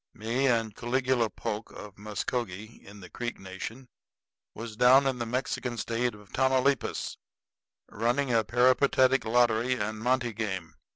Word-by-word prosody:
Me 115 +5 0
and 115 -4 +1
Caligula 125 -1 +1
Polk, 105 +1 -5
of 105 -2 -10
Muskogee 105 0 -4
in 100 0 -13
the 90 - -11
Creek 120 -1 -5
Nation, 95 +7 -7 0.7
was 115 0 -7
down 130 +4 +6
in 130 -2 0
the 120 - -2
Mexican 125 0 -2
State 115 +1 -1
of 105 -1 -17
Tamaulipas 130 0 +1 0.7
running 120 +4 0
a 115 -1 +4
peripatetic 130 +2 +3
lottery 120 +1 +3
and 110 -1 -3
monte 120 0 0
game. 95 -7 -4
120 Hz, 135 wpm, -28 LUFS, 110-125 Hz, 0.7 s, down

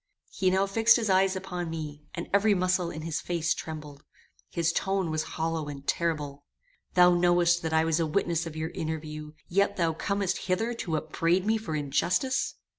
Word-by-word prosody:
He 185 - +1
now 190 +1 +2
fixed 225 +3 +5
his 225 -5 +1
eyes 190 0 +3
upon 180 -2 -4
me, 150 -2 -6
and 170 - -4
every 205 +1 +4
muscle 185 -1 +1
in 155 -1 -6
his 165 -1 -2
face 170 -2 0
trembled. 150 -2 -8 0.5
His 165 -1 0
tone 190 -3 0
was 155 0 0 0.2
hollow 160 -1 -1
and 140 -1 -8
terrible 150 -4 -1 0.5
"Thou 180 0 +7
knowest 175 0 +3
that 160 - -2
I 160 0 +3
was 165 0 +1
a 165 - +1
witness 170 0 0
of 160 - -8
your 160 +1 -3
interview, 155 -1 -5
yet 200 +3 +1
thou 165 -3 +1
comest 195 +3 -1
hither 225 +6 +1
to 170 -8 -2
upbraid 165 +4 0
me 220 +1 +2
for 165 -8 -4
injustice! 155 - 0
170 Hz, 185 wpm, -28 LUFS, 155-190 Hz, 0.5 s, Thou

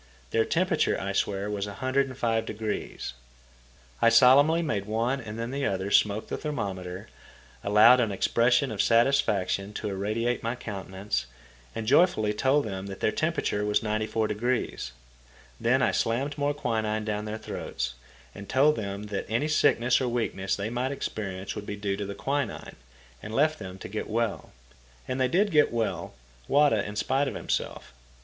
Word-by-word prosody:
Their 115 0 +2
temperature 175 -2 +1
I 100 +1 -3
swear 100 0 -1
was 105 -1 -2
105°. 115 - -2 0.9
I 115 - +6
solemnly 140 +8 +6
made 105 -10 -1
one 115 +5 0
and 110 -1 -7
then 115 +1 -4
the 140 +1 -1
other 95 +1 -2
smoke 105 +1 +3
the - - -3
thermometer, 95 - -4 0.6
allowed 110 +5 +7
an 115 -4 +1
expression 120 +6 +2
of 105 - 0
satisfaction 110 -5 +2
to 105 - -4
irradiate 110 +5 -1
my 115 +2 -2
countenance, 100 - -4 0.5
and 115 - -3
joyfully 125 - +3
told 135 +6 +2
them 95 -2 -5
that 95 0 -7
their - - +1
temperature 155 -10 -1
was 105 0 +1
94°. 110 - -1 0.7
Then - - +2
I - - +3
slammed 135 +6 0
more 145 0 0
quinine 110 -5 -1
down 105 -1 -2
their 110 +1 -4
throats, 65 - -4 0.5
told 140 +7 +3
them 100 -1 -4
that 105 -2 -4
any 115 +7 0
sickness 125 -5 +3
or 130 - 0
weakness 110 -5 -1
they 100 +3 -4
might 125 +3 -1
experience 95 -8 -4
would 105 - -7
be 105 - -3
due 100 -1 -2
to 100 -1 -4
the 100 - -5
quinine, 140 +6 -3 0.5
and 110 - -6
left 155 +3 +2
them 95 -2 -7
to - - -8
get 105 +3 -5
well. 115 -1 -2 0.6
And 130 0 -2
they 130 - +4
did 195 +10 +2
get 150 -2 +4
well, 115 - -2 0.3
Wada 140 -7 +4
in 105 - -6
spite 135 +6 +1
of - - -4
himself. - - -3
110 Hz, 160 wpm, -27 LUFS, 105-130 Hz, 0.9 s, allowed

